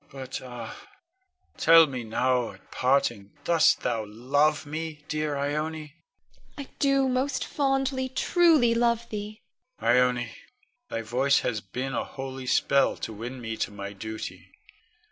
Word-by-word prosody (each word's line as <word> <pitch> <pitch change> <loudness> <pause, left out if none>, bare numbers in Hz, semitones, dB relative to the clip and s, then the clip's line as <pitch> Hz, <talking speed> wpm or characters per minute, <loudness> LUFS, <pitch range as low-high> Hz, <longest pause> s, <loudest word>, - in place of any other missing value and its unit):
But 135 -1 -6
ah! 120 -3 -8 0.8
tell 165 0 +7
me 130 -5 -5
now 125 +2 0
at - - -20
parting 120 -6 +1
dost 165 -2 +4
thou 110 -1 -1
love 145 +8 +1
me, 155 0 -5
dear 155 -1 -1
Ione? 140 +1 -1 0.4
Ione. - - -36 0.6
I 285 - -4 0.2
do, 275 -1 +3
most 260 +2 0
fondly, 270 -2 0
truly 310 -4 +4
love 235 0 +1
thee. 210 0 -6 0.4
Con. 120 +1 +3
Ione, 125 -2 +1 0.5
thy 115 - -3
voice 130 +5 +2
hath 105 -5 -3
been 135 +2 -3
a - - 0
holy 135 -1 -7
spell 140 +2 +3
to 110 - -5
win 120 +5 -6
me 115 -2 -4
to - - -1
my 100 -1 -7
duty. 110 +2 -7
135 Hz, 145 wpm, -27 LUFS, -, 0.8 s, tell